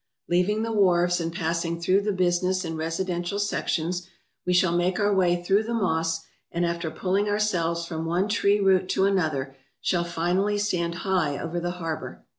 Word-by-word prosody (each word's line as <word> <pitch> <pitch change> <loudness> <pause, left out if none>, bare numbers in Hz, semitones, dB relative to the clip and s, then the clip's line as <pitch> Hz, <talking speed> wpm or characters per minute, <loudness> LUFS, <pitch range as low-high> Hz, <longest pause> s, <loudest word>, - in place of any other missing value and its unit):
Leaving 180 +5 +1
the 225 - -2
wharves 175 -4 +3
and 165 0 -2
passing 170 0 -2
through 185 +3 +3
the 210 +1 0
business 185 0 +1
and 165 0 -4
residential 175 +3 -2
sections, 180 -3 -1 0.4
we - - +2
shall 180 -1 +3
make 175 +2 +1
our 205 0 +2
way 175 -2 +2
through 195 +3 +3
the 230 +2 -3
moss, 165 -5 0 0.3
and 170 +1 0
after 170 -1 -2
pulling 190 +5 0
ourselves 175 -5 0
from 160 -1 -4
one 175 +4 +1
tree 205 -1 +2
root 190 -2 +3
to 190 - +2
another, 155 -9 0 0.2
shall 175 -2 +1
finally 175 +4 0
stand 175 -5 -1
high 180 -7 +1
over 170 +1 -3
the 175 +1 -2
harbour. 165 -3 -5
175 Hz, 175 wpm, -25 LUFS, 170-195 Hz, 0.4 s, wharves